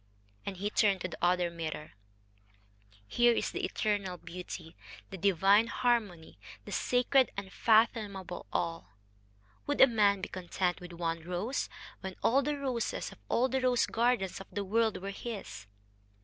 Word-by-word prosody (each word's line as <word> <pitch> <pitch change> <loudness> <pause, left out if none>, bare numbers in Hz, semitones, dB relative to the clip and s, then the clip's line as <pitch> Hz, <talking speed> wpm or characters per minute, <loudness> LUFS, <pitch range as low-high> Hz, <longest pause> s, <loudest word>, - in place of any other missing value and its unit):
And 195 -2 -4
he 205 +3 -2
turned 200 -4 +3
to 185 - -1
the 170 - -10
other 175 -1 +3
mirror 160 -2 -5 1.1
"Here 240 - +4
is - - -1
the - - -4
Eternal 200 -4 -1
Beauty, 170 -1 -8 0.4
the 195 - -6
Divine 200 +4 +4
Harmony, 220 -10 -1 0.3
the - - -8
Sacred 250 +1 +3
Unfathomable 200 -2 +1
All.... 165 - -3 0.7
Would - - -1
a - - +11
man 205 -5 +3
be 195 - -4
content 180 0 -2
with 175 -1 -9
one 165 -1 -2
rose, 180 +10 -2 0.3
when 190 -1 -6
all 265 +4 +4
the 290 +1 -1
roses 255 -5 -2
of - - -15
all 250 +2 +3
the 265 +1 -1
rose 250 -2 +3
gardens 230 -5 0
of - - -11
the 205 - -2
world 220 +2 +1
were 200 - -3
his?..." 200 - -7
200 Hz, 150 wpm, -31 LUFS, 180-230 Hz, 1.1 s, a